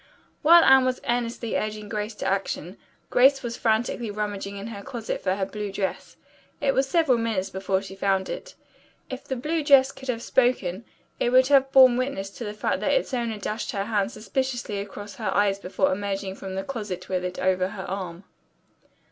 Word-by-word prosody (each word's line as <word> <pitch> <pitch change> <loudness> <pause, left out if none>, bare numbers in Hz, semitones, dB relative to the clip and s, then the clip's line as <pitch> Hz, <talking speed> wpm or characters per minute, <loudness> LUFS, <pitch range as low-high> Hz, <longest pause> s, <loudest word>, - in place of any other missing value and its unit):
While 335 +2 +8
Anne 265 0 +7
was 255 0 0
earnestly 235 -1 -1
urging 215 0 -3
Grace 210 +1 -4
to - - -6
action, 190 -1 -2 0.3
Grace 270 +2 +5
was 235 -1 -3
frantically 230 +1 0
rummaging 205 -1 -4
in 200 - -6
her 220 -3 -7
closet 235 -2 -5
for 185 -1 0
her 195 -1 -1
blue 210 0 -5
dress. 195 -1 -4 0.4
It 275 -1 +1
was 270 0 +1
several 295 -7 +3
minutes 220 -5 -1
before 190 0 -1
she 190 - -9
found 195 -1 0
it. - - -7 0.6
If 260 +1 -6
the 265 - -3
blue 305 +5 -1
dress 275 -2 +6
could 265 - -12
have 235 -2 -2
spoken 235 -6 +1 0.3
it - - +2
would 255 +2 +5
have 270 -1 +4
borne 260 -2 +7
witness 255 -7 -2
to 235 - -8
the 210 -1 -5
fact - - -1
that - - +1
its - - 0
owner 235 -3 -1
dashed 215 +6 -4
her 200 -1 -2
hand 210 -1 0
suspiciously 240 -1 -3
across 205 0 -8
her 215 -4 -2
eyes 200 -1 +2
before 200 +9 0
emerging 195 -1 -3
from 190 -1 -7
the 190 - -2
closet 205 -8 -5
with 185 -1 -1
it 180 0 -4
over 185 0 +1
her 190 -1 -7
arm. 185 -2 -5
215 Hz, 195 wpm, -25 LUFS, 195-255 Hz, 0.6 s, While